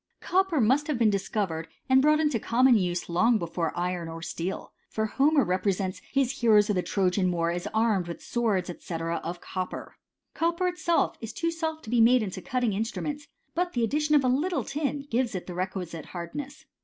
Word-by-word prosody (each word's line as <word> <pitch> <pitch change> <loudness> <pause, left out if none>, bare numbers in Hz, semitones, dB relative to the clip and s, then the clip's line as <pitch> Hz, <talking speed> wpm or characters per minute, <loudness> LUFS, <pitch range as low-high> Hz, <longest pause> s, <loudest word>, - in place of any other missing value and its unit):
Copper 375 -4 +1
must 260 +6 +3
have 300 -4 0
been 225 -3 +4
discovered 190 -5 -2 0.2
and 260 0 +5
brought 305 +2 +4
into 295 -7 +1
common 250 +3 +4
use 180 -4 0
long 220 +8 +3
before 170 -3 -2
iron 175 -1 -2
or 165 0 -7
steel; 175 +2 -4 0.2
for 220 - -1
Homer 280 +6 +3
re 185 -1 0
presents 190 -1 -1
his 275 -1 0
heroes 210 -2 +5
of - - 0
the 180 - +2
Trojan 185 -1 +1
war 170 -1 0
as 175 0 -3
armed 215 -5 +1
with 170 - -6
swords, 215 -7 -1
&c. - - -8
of 165 +1 -3
copper. 185 -1 -5 0.4
Copper 340 +2 0
itself 350 -1 +1
is 225 0 -5
too 335 0 -1
soft 320 -1 -3
to 220 - -8
be 240 -1 +4
made 240 +1 +5
into 190 -2 -5
cutting 245 -2 0
instruments; 285 +8 -3 0.3
but 355 +1 -1
the 240 - 0
addition 300 +5 +2
of 285 - +5
a - - +2
little 305 +8 +1
tin 285 -1 -3
gives 235 -2 0
it 185 - -4
the 180 - -7
requisite 180 -3 -4
hardness. 260 +12 -7
225 Hz, 195 wpm, -27 LUFS, 180-280 Hz, 0.4 s, and